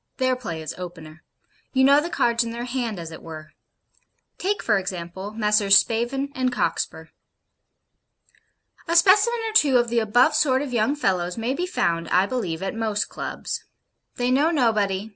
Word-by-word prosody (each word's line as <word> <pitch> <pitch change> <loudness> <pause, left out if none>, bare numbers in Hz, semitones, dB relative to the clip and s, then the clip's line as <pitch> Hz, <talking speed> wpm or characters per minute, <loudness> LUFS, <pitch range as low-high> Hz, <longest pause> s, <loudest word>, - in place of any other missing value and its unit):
Their 255 -1 +1
play 170 -11 -6
is 155 - -5
opener. 165 -3 -9 0.5
You 265 -1 +3
know 280 +2 +6
the 335 - -4
cards 235 -6 +1
in 230 - -5
their 235 +1 -5
hand, 240 -4 -3
as 165 -1 -7
it 160 - -10
were. 155 -1 -10 0.9
Take, 405 +2 -1
for 200 - +2
example, 185 +1 -6
Messrs. 210 -2 +4
Spavin 255 +5 0
and 255 -1 0
Cockspur. - - -2 1.8
A 335 - 0
specimen 410 +7 +5
or 440 - -4
two 285 -11 +5
of 240 -1 +1
the 235 0 +1
above 245 +7 +3
sort 270 -2 +2
of 270 -3 -6
young 240 +5 +1
fellows 180 -9 -1
may 230 +3 -1
be 355 +5 -3
found, 170 - -1
I 185 +2 +3
believe, 190 -8 -3
at 195 - -3
most 220 -2 -2
Clubs. - - -5 0.5
They 245 0 0
know 285 +5 +3
nobody. 215 - 0
230 Hz, 170 wpm, -23 LUFS, 190-265 Hz, 1.8 s, know